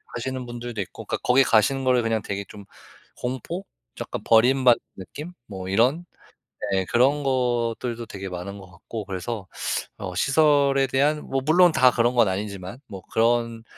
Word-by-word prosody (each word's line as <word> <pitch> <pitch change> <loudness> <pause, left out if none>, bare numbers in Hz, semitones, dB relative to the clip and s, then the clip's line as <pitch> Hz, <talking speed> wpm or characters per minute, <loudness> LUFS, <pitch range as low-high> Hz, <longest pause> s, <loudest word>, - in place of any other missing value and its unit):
하시는 130 +1 -4
분들도 120 -2 -7
있고. 90 - -8
그러니까 - - -2
거기 130 +2 +5
가시는 130 +4 +2
거를 125 -2 +3 0.2
되게 100 0 -4
쫌 100 -1 -11 0.5
공포 130 - -4 0.3
좀 - - -5
약간 - - -5
버림받는 125 +2 +5 0.2
느낌 145 - -8
뭐 95 -2 -7
이런 130 - +2 0.7
예 95 -1 +1
그런 135 +7 +2
것들도 120 -2 -1
되게 100 -1 -7
많은 90 +3 -6
것 95 - -13
같고 100 +5 -8
그래서 95 +2 -5 0.5
어 90 -3 -6
시설에 140 - +3
대한 145 +4 +1
뭐 135 - -1
물론 175 +3 +6
다 130 -4 +5
그런 120 +1 +2
건 120 -3 +5
아니지만 100 +2 -4
뭐 95 -3 -9
그런 115 0 +1
120 Hz, 315 characters per minute, -24 LUFS, 100-135 Hz, 0.7 s, 물론